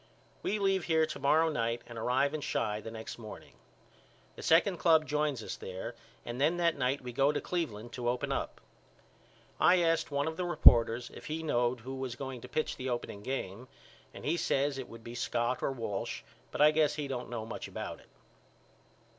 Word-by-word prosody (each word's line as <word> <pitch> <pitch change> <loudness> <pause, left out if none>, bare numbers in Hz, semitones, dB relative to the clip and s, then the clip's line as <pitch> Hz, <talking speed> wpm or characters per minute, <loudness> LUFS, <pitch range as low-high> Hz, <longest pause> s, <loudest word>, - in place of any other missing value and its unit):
We 210 - 0
leave 195 -3 +1
here 160 -1 +3
to 155 -2 -6
morrow 155 +4 +4
night 115 -5 -1
and 120 - -10
arrive 125 +5 +1
in 155 - -2
Chi 105 -5 -1
the 115 - -7
next 110 +1 -7
morning. 110 -2 -10 0.8
The - - -9
second 175 +3 +4
club 160 -2 +5
joins 150 -5 0
us - - -4
there 95 +5 -6 0.3
and 120 +2 -4
then 160 +5 +3
that 170 -1 +2
night 130 +1 0
we 125 -1 -7
go 135 +4 +4
to 150 - -1
Cleveland 120 -10 -3
to 120 -1 -1
open 125 0 -1
up. - - -2 1.0
I 180 - +6
asked 165 -1 +2
one 140 +1 0
of 160 0 -3
the 180 - -1
reporters 120 -8 +6
if - - -10
he 160 +1 -3
knowed 120 -4 +1
who 130 +3 -6
was 130 -2 -4
going 130 -2 -6
to - - -10
pitch 155 - -1
the 130 0 -3
opening 120 -4 -3
game 120 -1 -4 0.4
and - - -10
he 165 +4 +1
says 140 -3 +1
it 130 - -6
would 115 0 -11
be 115 - -8
Scott 120 +1 -1
or - - 0
Walsh 115 -6 -4 0.3
but - - -3
I 150 +1 +8
guess 155 -1 +2
he 150 -2 -3
don't 125 -2 -4
know 115 -2 -4
much - - -6
about - - -6
it. - - -20
135 Hz, 205 wpm, -32 LUFS, 120-155 Hz, 1.0 s, I